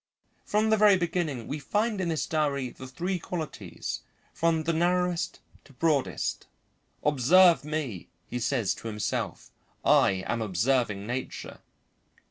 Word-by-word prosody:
From 215 +1 +2
the 220 - +5
very 205 -2 +6
beginning 170 -8 -2
we 150 - -3
find 210 +7 0
in 175 - -1
this 160 -2 0
diary 140 -5 0
the 130 - -10
three 175 +8 -2
qualities, 155 - -5 0.3
from 165 -1 +1
the 165 +1 0
narrowest 175 +1 0 0.2
to 140 - -18
broadest. 135 - 0 0.6
"Observe 150 +3 +5
me," 145 - -4 0.2
he 125 - -4
says 120 -3 +1
to - - -8
himself, 105 -2 -3 0.3
"I 95 -1 +4
am 115 - -1
observing 105 +1 +1
nature." 125 +3 -5
150 Hz, 130 wpm, -28 LUFS, 120-175 Hz, 0.6 s, very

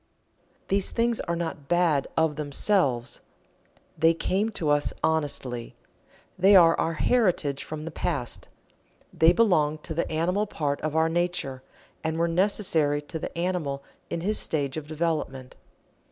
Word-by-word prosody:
These 195 0 +1
things 235 0 0
are 170 - -2
not 160 -4 -5
"bad" 170 -4 +2
of 160 -2 +2
themselves 145 - 0 0.7
they 165 +1 +3
came 195 +6 0
to 155 -6 0
us 145 0 +1
honestly 140 -6 -2 0.6
they 195 +2 +6
are 165 -3 +7
our 165 - 0
heritage 170 - +1
from 155 0 -6
the 165 - -5
past. - - -3 0.7
They 165 +1 +5
belong 175 -8 +3
to 165 - -5
the 165 +1 -2
animal 180 +6 0
part 145 -7 -2
of 155 0 -3
our 160 0 +3
nature, 170 -6 -1 0.4
and 160 0 -1
were 170 +1 +2
necessary 165 -5 +2
to 160 +2 -6
the - - -6
animal 170 -6 -2 0.3
in 165 - -3
his 210 +4 0
stage 140 -4 -1
of 155 -2 -5
development. 155 -5 -3
160 Hz, 145 wpm, -26 LUFS, 145-180 Hz, 0.7 s, are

